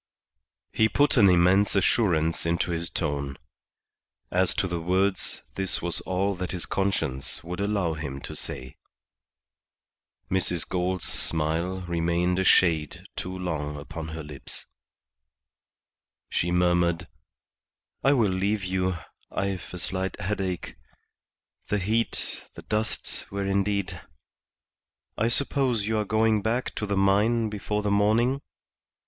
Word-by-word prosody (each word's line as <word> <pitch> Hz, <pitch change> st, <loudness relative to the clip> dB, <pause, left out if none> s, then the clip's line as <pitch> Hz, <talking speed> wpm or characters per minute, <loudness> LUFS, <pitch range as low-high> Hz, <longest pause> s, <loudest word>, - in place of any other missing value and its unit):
He 110 Hz, 0 st, +3 dB
put 145 Hz, +7 st, +3 dB
an 105 Hz, -6 st, +7 dB
immense 90 Hz, +4 st, +4 dB
assurance 85 Hz, -5 st, +2 dB
into 85 Hz, +1 st, 0 dB
his 85 Hz, 0 st, -2 dB
tone. 70 Hz, -4 st, -2 dB, 0.9 s
As 90 Hz, 0 st, +3 dB
to 95 Hz, -, +1 dB
the 85 Hz, -2 st, -3 dB
words, 95 Hz, +3 st, 0 dB
this 95 Hz, -1 st, -1 dB
was 85 Hz, 0 st, -1 dB
all 95 Hz, +2 st, +1 dB
that 90 Hz, 0 st, -3 dB
his 90 Hz, -, -3 dB
conscience 85 Hz, -11 st, -1 dB
would 90 Hz, +2 st, -5 dB
allow 100 Hz, -5 st, 0 dB
him 70 Hz, -3 st, -5 dB
to -, -, -7 dB
say. 65 Hz, 0 st, -5 dB, 1.5 s
Mrs. 90 Hz, -3 st, +2 dB
Gould's 90 Hz, 0 st, -1 dB
smile 85 Hz, +4 st, 0 dB
remained 85 Hz, +1 st, 0 dB
a -, -, +2 dB
shade 80 Hz, -6 st, +3 dB
too 95 Hz, +1 st, -4 dB
long 75 Hz, -5 st, -3 dB
upon 80 Hz, +2 st, -6 dB
her 80 Hz, 0 st, -6 dB
lips. 75 Hz, -2 st, -8 dB, 1.7 s
She 85 Hz, -, +1 dB
murmured 85 Hz, -1 st, +2 dB, 1.0 s
"I 135 Hz, +2 st, +5 dB
will 115 Hz, -8 st, +3 dB
leave 100 Hz, +2 st, 0 dB
you; 95 Hz, -1 st, 0 dB, 0.3 s
I've 95 Hz, -2 st, -3 dB
a 90 Hz, -, -6 dB
slight 95 Hz, +2 st, -3 dB
headache. 95 Hz, -2 st, -3 dB, 0.9 s
The 105 Hz, -, +1 dB
heat, 110 Hz, +4 st, -1 dB
the -, -, -10 dB
dust, 110 Hz, 0 st, -3 dB
were 100 Hz, 0 st, -3 dB
indeed 100 Hz, -3 st, 0 dB, 1.1 s
I 110 Hz, -, +1 dB
suppose 125 Hz, -3 st, +2 dB
you 110 Hz, 0 st, +1 dB
are 105 Hz, -, 0 dB
going 110 Hz, 0 st, +2 dB
back 115 Hz, +4 st, -1 dB
to 105 Hz, -, -3 dB
the 100 Hz, -1 st, 0 dB
mine 105 Hz, +4 st, +3 dB
before 105 Hz, 0 st, -2 dB
the 105 Hz, -, +1 dB
morning?" 115 Hz, +7 st, +3 dB
95 Hz, 130 wpm, -27 LUFS, 85-105 Hz, 1.7 s, an